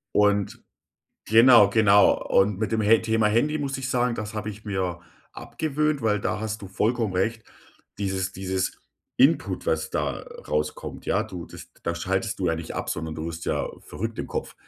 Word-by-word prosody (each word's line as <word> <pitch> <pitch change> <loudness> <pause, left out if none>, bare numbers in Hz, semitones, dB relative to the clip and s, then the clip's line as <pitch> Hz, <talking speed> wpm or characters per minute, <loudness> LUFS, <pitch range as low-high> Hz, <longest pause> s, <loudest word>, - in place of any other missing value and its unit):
Und 105 -1 +2 0.6
genau, 115 -1 +7
genau. 105 -2 +5
Und 95 0 +3
mit 110 - -1
dem 110 - +1
Ha 110 +2 +6
Thema 110 -1 +1
Handy 135 +9 +2
muss 140 -2 -2
ich 130 -1 -4
sagen, 125 -1 +1
das 110 0 -5
habe 105 0 -4
ich 105 +1 -12
mir 95 -4 -2 0.3
abgewöhnt, 150 -1 -2
weil 105 -3 +1
da 95 - -1
hast 110 0 -4
du 100 - -7
vollkommen 110 +1 0
recht, 110 +5 -1 0.5
dieses 95 -2 -2
dieses 95 0 -2 0.4
Input, - - +2
was - - 0
da - - -2 0.2
rauskommt, 75 0 -3
ja, - - +1
du 90 -2 -7
das - - -12
da 85 - -1
schaltest 95 +6 -2
du 95 - -1
ja 80 - +2
nicht 80 0 -6
ab, - - -4
sondern 80 -1 -3
du 80 +1 -4
wirst 85 0 -6
ja - - -1
verrückt 115 +2 -6
im - - -6
Kopf. - - -4
105 Hz, 185 wpm, -25 LUFS, 95-115 Hz, 0.6 s, genau